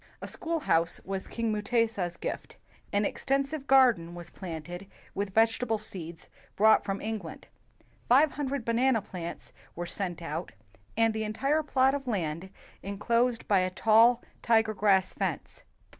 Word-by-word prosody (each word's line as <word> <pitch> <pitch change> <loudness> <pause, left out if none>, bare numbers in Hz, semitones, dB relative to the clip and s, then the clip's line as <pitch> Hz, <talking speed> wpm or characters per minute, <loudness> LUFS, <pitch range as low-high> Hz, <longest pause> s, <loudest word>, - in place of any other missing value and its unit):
A - - -7
schoolhouse 290 - 0
was 195 0 -4
king 230 -1 -2
Mutesa 215 -3 0
's 170 - -14
gift. - - -5 0.3
An 205 +1 +1
extensive 275 +5 -1
garden 235 -11 +4
was 175 0 -9
planted 175 +1 -7 0.3
with 200 -1 -3
vegetable 225 +1 +2
seeds 170 -6 -8 0.3
brought 220 +2 +5
from 195 -1 -3
England. 215 -6 -5 0.6
Five 280 +5 +6
hundred 280 -4 -3
banana 230 -1 +2
plants 175 -4 -8 0.2
90 - - -34
WHITE 175 +3 -5
MEN 195 - +1
AND 175 -2 -8
BLACK 170 - -9
MEN - - -5
were - - -3
set - - -2
out, 170 +2 -5 0.5
and 225 -1 +3
the 220 0 -2
entire 270 +9 0
plot 265 -3 +2
of 280 -2 -4
land 175 -4 -2 0.3
en 200 +1 -5
closed 235 +3 +1
by 200 -2 +4
a 185 0 +1
tall 225 +5 +4 0.2
tiger 225 -2 +3
grass 195 -2 +2
fence. - - -4
215 Hz, 170 wpm, -29 LUFS, 185-245 Hz, 0.6 s, Five